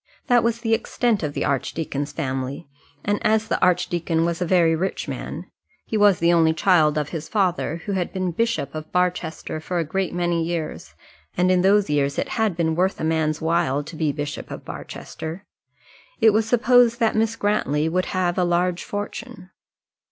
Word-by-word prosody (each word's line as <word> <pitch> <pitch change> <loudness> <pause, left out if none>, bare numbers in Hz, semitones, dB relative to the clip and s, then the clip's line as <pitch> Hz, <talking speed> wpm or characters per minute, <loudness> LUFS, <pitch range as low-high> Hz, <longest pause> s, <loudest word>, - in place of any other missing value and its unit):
That 245 -1 +4
was 235 0 0
the 225 -2 +1
extent 225 -1 0
of 150 -3 -3
the - - -1
archdeacon's 145 +1 -2
family, 135 0 -4 0.4
and 205 +1 +1
as 220 0 +2
the - - -1
archdeacon 175 -2 +1
was 170 +1 -2
a 180 - 0
very 170 -2 +4
rich 185 +4 -2
man - - -5 0.4
he - - -4
was 205 -3 +5
the 170 +1 +3
only 160 -1 +4
child 160 -3 +3
of 150 -1 -1
his 160 -2 -6
father, 180 -5 0
who 205 - -3
had 185 -3 -1
been 185 -1 -2
Bishop 230 - -1
of 155 0 -7
Barchester 180 -3 -1
for 175 +3 -4
a 170 - +1
great 190 +4 -2
many 175 -1 0
years; 165 -1 -4 0.4
and 180 +1 +3
in 180 -1 +3
those 200 +2 +4
years 140 -1 0
it - - -1
had 220 -6 0
been 160 -2 +1
worth 185 +3 +1
a - - -4
man's 160 -1 0
while 160 -4 +1
to 155 +3 -10
be 155 -2 0
Bishop 145 0 -5
of - - -8
Barchester 165 +5 -7 0.7
it 220 - +6
was 220 +1 +2
supposed 245 0 +4
that 225 -2 +2
Miss 225 +1 +1
Grantly 160 -9 0
would 180 +3 0
have 185 -1 -1
a - - +3
large 175 0 +1
fortune. 205 -1 -6
175 Hz, 190 wpm, -23 LUFS, 160-205 Hz, 0.7 s, it